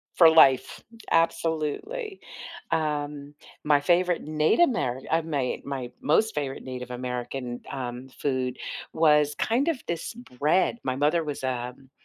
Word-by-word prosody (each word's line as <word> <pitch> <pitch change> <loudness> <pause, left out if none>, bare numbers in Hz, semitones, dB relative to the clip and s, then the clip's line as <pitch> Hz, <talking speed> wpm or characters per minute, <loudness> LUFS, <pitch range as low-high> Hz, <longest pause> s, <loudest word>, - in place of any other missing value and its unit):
for 165 -2 +8
life. 135 -5 +5 0.3
Absolutely. 165 - 0 0.5
Um, 145 -2 -2 0.3
my 145 -1 +4
favorite 175 +2 +2
Native 155 - +1
Amer 225 - +2
uh, 165 +1 +3
may 145 -6 -2
my 135 -3 -4
most 220 +9 +2
favorite 140 -3 -3
Native 125 -1 -6
American, 125 0 -4
um, 125 0 -5
food 130 -2 -2 0.4
was 150 -2 +4
kind 250 +7 +1
of 330 -4 +1
this 170 +6 -3 0.3
bread 170 +10 +2
my 130 -1 -1
mother 150 +5 +2
was, 145 -3 -5
um, 125 +1 -4
150 Hz, 130 wpm, -26 LUFS, 130-165 Hz, 0.5 s, for